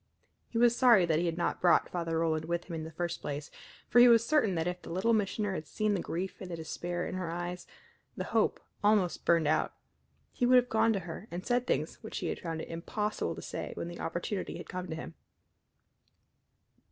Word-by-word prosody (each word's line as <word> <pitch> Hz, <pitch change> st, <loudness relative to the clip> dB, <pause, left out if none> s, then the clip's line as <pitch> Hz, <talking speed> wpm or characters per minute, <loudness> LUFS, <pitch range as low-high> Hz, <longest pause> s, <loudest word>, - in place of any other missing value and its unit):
He 230 Hz, -, -4 dB
was 240 Hz, 0 st, +5 dB
sorry 235 Hz, -8 st, +6 dB
that 160 Hz, -2 st, +2 dB
he 175 Hz, -, 0 dB
had 165 Hz, 0 st, -2 dB
not 175 Hz, -, -1 dB
brought 175 Hz, -1 st, +5 dB
Father 165 Hz, -2 st, -1 dB
Roland 160 Hz, -1 st, 0 dB
with 170 Hz, +1 st, -1 dB
him 175 Hz, -, -9 dB
in 160 Hz, -1 st, -4 dB
the 160 Hz, -, -8 dB
first 170 Hz, +1 st, -3 dB
place, 145 Hz, +1 st, -5 dB, 0.4 s
for 240 Hz, -, +5 dB
he 245 Hz, -, +9 dB
was 230 Hz, -1 st, +6 dB
certain 235 Hz, -10 st, +2 dB
that 165 Hz, -1 st, 0 dB
if 180 Hz, 0 st, -3 dB
the -, -, -10 dB
Little 190 Hz, +7 st, +1 dB
Missioner 205 Hz, -1 st, 0 dB
had 155 Hz, -4 st, -5 dB
seen 215 Hz, -1 st, 0 dB
the 190 Hz, -, 0 dB
grief 185 Hz, +4 st, -4 dB
and 185 Hz, -, -6 dB
the 170 Hz, -, -3 dB
despair 175 Hz, +2 st, -4 dB
in -, -, -5 dB
her 185 Hz, -2 st, -3 dB
eyes 175 Hz, +1 st, -4 dB, 0.5 s
the -, -, -2 dB
hope -, -, +1 dB, 0.2 s
almost 205 Hz, -4 st, +2 dB
burned 165 Hz, -3 st, +4 dB
out 155 Hz, +1 st, +1 dB, 0.6 s
he -, -, -4 dB
would 255 Hz, -, +6 dB
have 250 Hz, 0 st, +5 dB
gone 225 Hz, +1 st, +3 dB
to 195 Hz, -, -1 dB
her 175 Hz, +5 st, -8 dB
and 175 Hz, +2 st, -6 dB
said 245 Hz, 0 st, +1 dB
things -, -, -1 dB
which -, -, -6 dB
he -, -, -2 dB
had -, -, -3 dB
found 165 Hz, -2 st, -4 dB
it -, -, -8 dB
impossible 210 Hz, +6 st, -2 dB
to -, -, -8 dB
say -, -, -5 dB
when 170 Hz, -, -4 dB
the 175 Hz, -, -8 dB
opportunity 180 Hz, +4 st, -3 dB
had -, -, -9 dB
come 185 Hz, 0 st, -5 dB
to 160 Hz, -, -4 dB
him. 160 Hz, -, -7 dB
175 Hz, 225 wpm, -31 LUFS, 165-210 Hz, 0.6 s, he